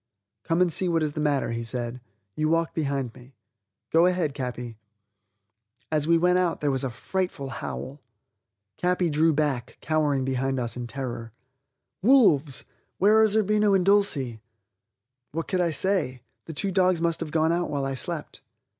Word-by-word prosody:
"Come 165 +1 +1
and 175 -3 0
see 185 +3 0
what 165 -2 +1
is 150 -1 -2
the 155 - -4
matter," 145 -5 +1
he 115 0 -3
said; 120 +1 -4 0.3
"you 155 0 0
walk 165 0 +1
behind 140 -6 -2
me. 125 +1 -16 0.6
Go 165 +2 +5
ahead, 180 -5 0
Capi." 125 -4 -5 1.1
As 155 -1 +1
we 170 0 +5
went 180 +2 +3
out 180 -2 0
there 145 -1 0
was 135 0 -1
a 135 - -1
frightful 140 +2 -3
howl. 135 +1 -6 0.8
Capi 180 -1 +1
drew 160 +2 +3
back, 140 -5 -1
cowering 150 -4 0
behind 135 0 -1
us 120 -2 -3
in 120 -1 -5
terror. 120 -3 -6 0.7
"Wolves! 185 - +4 0.3
Where 215 +3 +5
are 220 - +6
Zerbino 210 -1 +3
and 185 -2 +2
Dulcie?" 145 - +2 0.9
What 165 +1 -3
could 185 -2 0
I 175 - +2
say? 155 - 0 0.2
The 165 - -7
two 195 +6 -2
dogs 185 -2 +3
must 170 -1 0
have 165 - -4
gone 160 +1 +2
out 175 +1 0
while 140 -2 -2
I 135 - -2
slept. 130 - -4
155 Hz, 170 wpm, -26 LUFS, 135-180 Hz, 1.1 s, are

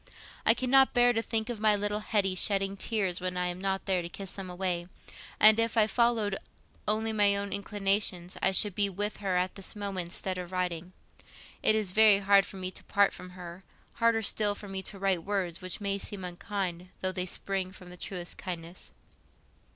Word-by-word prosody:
I 225 - +8
cannot 265 +2 +4
bear 245 0 +5
to 225 - 0
think 225 -1 -1
of 240 -3 -4
my 215 -1 +4
little 205 +1 -1
Hetty 205 -3 +1
shedding 195 +1 0
tears 195 -4 -1
when 180 0 -3
I 180 - 0
am 175 +1 -6
not 195 0 -1
there 185 -2 +1
to 170 - -6
kiss 195 +1 -6
them 195 -2 -7
away; 180 -1 -2 0.5
and 215 +1 +8
if 230 0 0
I 215 - +6
followed 220 -3 +1 0.5
only 220 +1 +1
my 205 -2 +4
own 200 0 -2
inclinations, 195 -3 -1
I 190 - +3
should 205 +1 +3
be 200 +1 +3
with 205 +3 -3
her 190 -3 -1
at 180 +1 0
this 195 +2 -2
moment 195 -4 -3
instead 185 +1 -3
of 180 0 -7
writing. 180 -1 -3 0.7
It 215 - +4
is 210 -4 0
very 215 0 +6
hard 200 -1 +4
for 195 - -9
me 185 0 -4
to - - -8
part 200 -1 +3
from 180 - -10
her—harder 195 +6 -3
still 205 0 +1
for 205 - -9
me 195 -1 -4
to 195 - -5
write 190 -3 +1
words 190 -3 -2
which 185 -1 -4
may 200 -1 -1
seem 200 -1 -5
unkind, 180 0 -4
though 185 - 0
they 185 0 -2
spring 190 0 -2
from 180 -1 -13
the - - -9
truest 180 -1 -6
kindness. 175 -1 -8
195 Hz, 200 wpm, -29 LUFS, 185-210 Hz, 0.7 s, I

